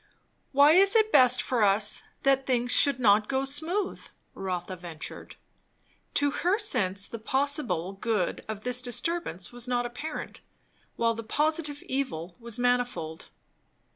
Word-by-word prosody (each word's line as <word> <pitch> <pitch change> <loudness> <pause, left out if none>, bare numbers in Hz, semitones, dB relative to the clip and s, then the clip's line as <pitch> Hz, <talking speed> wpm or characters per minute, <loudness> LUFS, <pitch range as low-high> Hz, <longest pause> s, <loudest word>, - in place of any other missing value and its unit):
"Why 285 +2 +6
is 390 +5 +5
it 435 -1 +3
best 250 - +6
for 250 -3 -1
us 205 +1 +2 0.2
that 270 -1 +2
things 245 -1 0
should 280 -1 +6
not 210 -2 +3
go 270 0 0
smooth?" 325 +8 -2 0.3
Rotha 185 -1 -5
ventured. 170 -3 -9 0.8
To 285 0 +3
her 360 +7 0
sense 200 - -1
the 230 - -8
possible 240 - -1
good 205 -2 -2
of 215 -1 -6
this 250 0 +1
disturbance 245 - -3
was 245 0 -6
not 245 -1 0
apparent, 285 +6 -7 0.6
while 230 0 +1
the 230 - -6
positive 300 +4 -1
evil 185 -11 -4
was 235 -2 -2
manifold. 245 -10 -1
245 Hz, 140 wpm, -27 LUFS, 205-285 Hz, 0.8 s, Why